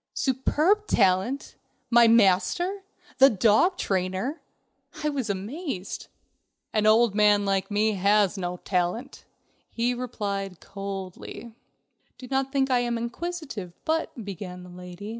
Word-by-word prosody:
Superb 310 Hz, -, +1 dB
talent! 195 Hz, +7 st, +1 dB, 0.4 s
My 235 Hz, 0 st, +7 dB
master! 230 Hz, -, +3 dB, 0.4 s
The 270 Hz, +1 st, +9 dB
dog 220 Hz, -, +3 dB
trainer! 190 Hz, -, -2 dB, 0.6 s
I 300 Hz, -, +2 dB
was 270 Hz, -6 st, -3 dB
amazed. 205 Hz, -, -4 dB, 0.7 s
"An 215 Hz, -1 st, +2 dB
old 225 Hz, 0 st, +5 dB
man 205 Hz, -1 st, +4 dB
like 195 Hz, -1 st, 0 dB
me 215 Hz, +1 st, +2 dB
has 200 Hz, 0 st, +2 dB
no 180 Hz, -2 st, -4 dB
talent," 185 Hz, +10 st, -2 dB, 0.4 s
he 240 Hz, +1 st, 0 dB
replied 200 Hz, -7 st, -4 dB
coldly. 195 Hz, +3 st, -7 dB, 0.6 s
"Do 255 Hz, -, -10 dB
not 270 Hz, 0 st, 0 dB
think 270 Hz, -1 st, +1 dB
that 255 Hz, -, +3 dB
I -, -, +2 dB
am 240 Hz, -1 st, -1 dB
inquisitive, 235 Hz, -, -5 dB
but...." 315 Hz, -8 st, -2 dB
began 180 Hz, -2 st, -7 dB
the 180 Hz, -, -12 dB
lady. 180 Hz, +3 st, -9 dB
215 Hz, 125 wpm, -26 LUFS, 195-265 Hz, 0.7 s, The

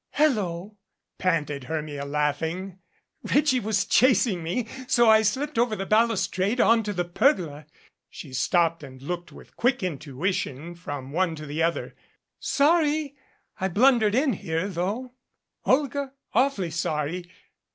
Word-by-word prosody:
"Hello!" 210 Hz, -, 0 dB, 0.4 s
panted 150 Hz, -7 st, -1 dB
Hermia, 150 Hz, -1 st, -4 dB
laughing. 160 Hz, +6 st, -2 dB, 0.4 s
"Reggie 285 Hz, -2 st, +2 dB
was 210 Hz, -3 st, 0 dB
chasing 240 Hz, -6 st, +3 dB
me, 180 Hz, +9 st, -2 dB, 0.2 s
so 240 Hz, -2 st, +4 dB
I 220 Hz, 0 st, +7 dB
slipped 260 Hz, +6 st, -1 dB
over 235 Hz, -2 st, +2 dB
the 195 Hz, -, -4 dB
balustrade 215 Hz, 0 st, +1 dB
onto 225 Hz, -3 st, +3 dB
the 180 Hz, -3 st, -2 dB
pergola 170 Hz, -, +1 dB, 0.2 s
" -, -, -53 dB
She 140 Hz, -5 st, -10 dB
stopped 165 Hz, +4 st, +1 dB
and 130 Hz, -2 st, -11 dB
looked 175 Hz, +5 st, -5 dB
with -, -, -15 dB
quick 245 Hz, 0 st, +1 dB
intui 155 Hz, 0 st, -2 dB
tion 155 Hz, +2 st, -4 dB
from 145 Hz, -6 st, -7 dB
one 170 Hz, +1 st, 0 dB
to 155 Hz, -1 st, -8 dB
the 150 Hz, +2 st, -3 dB
other. 165 Hz, +1 st, -1 dB, 0.5 s
"Sorry 300 Hz, -1 st, +2 dB, 0.4 s
I 190 Hz, -, 0 dB
blunder'd 220 Hz, +1 st, +4 dB
in 270 Hz, 0 st, +2 dB
here, 165 Hz, 0 st, -2 dB
though, 205 Hz, +8 st, -3 dB, 0.5 s
Olga 275 Hz, 0 st, +1 dB, 0.2 s
awfully 230 Hz, -9 st, +1 dB
sorry. 160 Hz, +2 st, -2 dB
185 Hz, 135 wpm, -25 LUFS, 160-240 Hz, 0.5 s, I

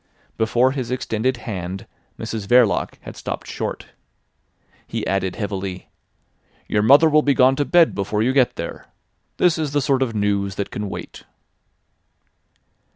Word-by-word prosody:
Before 120 Hz, +3 st, +2 dB
his 130 Hz, -4 st, -4 dB
extended 125 Hz, 0 st, -1 dB
hand 95 Hz, -3 st, -5 dB, 0.3 s
Mrs 110 Hz, -3 st, -5 dB
Verloc 120 Hz, -3 st, +3 dB
had -, -, -10 dB
stopped -, -, -5 dB
short. -, -, -5 dB, 1.0 s
He -, -, -4 dB
added 95 Hz, -1 st, -1 dB
heavily: 100 Hz, -3 st, -5 dB, 0.8 s
"Your 105 Hz, -, +1 dB
mother 140 Hz, +8 st, +6 dB
will 155 Hz, 0 st, +4 dB
be 140 Hz, -2 st, +2 dB
gone 130 Hz, 0 st, +5 dB
to 145 Hz, -, +1 dB
bed 170 Hz, 0 st, +4 dB
before 105 Hz, +2 st, -1 dB
you 130 Hz, +3 st, +1 dB
get 130 Hz, -3 st, +3 dB
there. -, -, -7 dB, 0.5 s
This 170 Hz, -2 st, +3 dB
is 150 Hz, -3 st, -2 dB
the 145 Hz, -, +3 dB
sort 135 Hz, 0 st, +1 dB
of 120 Hz, -4 st, -1 dB
news 100 Hz, -1 st, 0 dB
that 100 Hz, -, -4 dB
can 105 Hz, -1 st, -4 dB
wait." -, -, -8 dB
115 Hz, 150 wpm, -21 LUFS, 100-135 Hz, 1.0 s, mother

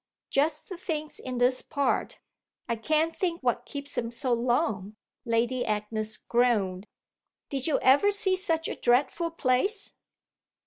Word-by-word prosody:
"Just 300 Hz, +2 st, +1 dB
the 370 Hz, -, -7 dB
things 310 Hz, -4 st, -4 dB
in 255 Hz, -1 st, -5 dB
this 250 Hz, +1 st, +2 dB
part. 285 Hz, -3 st, -1 dB, 0.5 s
I 235 Hz, -, 0 dB
can't 310 Hz, +7 st, +1 dB
think 345 Hz, -2 st, -1 dB
what 245 Hz, -1 st, 0 dB
keeps 285 Hz, 0 st, -6 dB
them 230 Hz, -, -2 dB
so 240 Hz, +2 st, -1 dB
long," 225 Hz, -4 st, 0 dB, 0.3 s
Lady 235 Hz, +2 st, +1 dB
Agnes 215 Hz, 0 st, -2 dB
groaned. 215 Hz, -6 st, +1 dB, 0.6 s
"Did 270 Hz, 0 st, -1 dB
you 310 Hz, -, +2 dB
ever 280 Hz, +10 st, +6 dB
see 400 Hz, -2 st, +3 dB
such 330 Hz, -4 st, +1 dB
a -, -, -4 dB
dreadful 265 Hz, +7 st, +2 dB
place?" 330 Hz, -, 0 dB
255 Hz, 140 wpm, -28 LUFS, 235-320 Hz, 0.6 s, ever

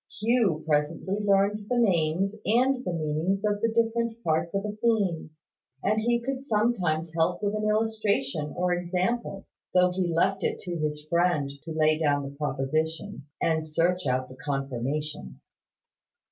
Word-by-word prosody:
Hugh 210 Hz, -8 st, +2 dB
presently 160 Hz, +6 st, 0 dB
learned 200 Hz, +1 st, +2 dB
the 250 Hz, -, +1 dB
names 190 Hz, -3 st, +2 dB
and 255 Hz, +4 st, +2 dB
the 180 Hz, -, -2 dB
meanings 165 Hz, +5 st, -1 dB
of 205 Hz, -1 st, 0 dB
the 230 Hz, -, +3 dB
different 230 Hz, 0 st, 0 dB
parts 160 Hz, +2 st, 0 dB
of 195 Hz, +1 st, -1 dB
a 210 Hz, -, -2 dB
theme; 210 Hz, -7 st, 0 dB, 0.5 s
and 215 Hz, +2 st, +2 dB
he 235 Hz, +1 st, +2 dB
could 260 Hz, +2 st, -3 dB
sometimes 205 Hz, -, 0 dB
help 170 Hz, +4 st, 0 dB
with 205 Hz, 0 st, +1 dB
an 215 Hz, 0 st, 0 dB
illustration 210 Hz, -10 st, 0 dB
or 180 Hz, 0 st, +1 dB
example, 185 Hz, +4 st, -2 dB, 0.3 s
though 180 Hz, 0 st, +5 dB
he 180 Hz, -1 st, -1 dB
left 190 Hz, +4 st, +1 dB
it -, -, 0 dB
to 175 Hz, -2 st, -4 dB
his 150 Hz, -1 st, -3 dB
friend 170 Hz, -4 st, +1 dB
to 165 Hz, -, -6 dB
lay 155 Hz, 0 st, +2 dB
down 145 Hz, -2 st, +2 dB
the 140 Hz, 0 st, -7 dB
Proposition, 155 Hz, +4 st, -2 dB
and 160 Hz, -1 st, +1 dB
search 170 Hz, +2 st, 0 dB
out 130 Hz, 0 st, 0 dB
the 130 Hz, -, -13 dB
Confirmation. 135 Hz, -, -3 dB
180 Hz, 155 wpm, -27 LUFS, 155-210 Hz, 0.5 s, though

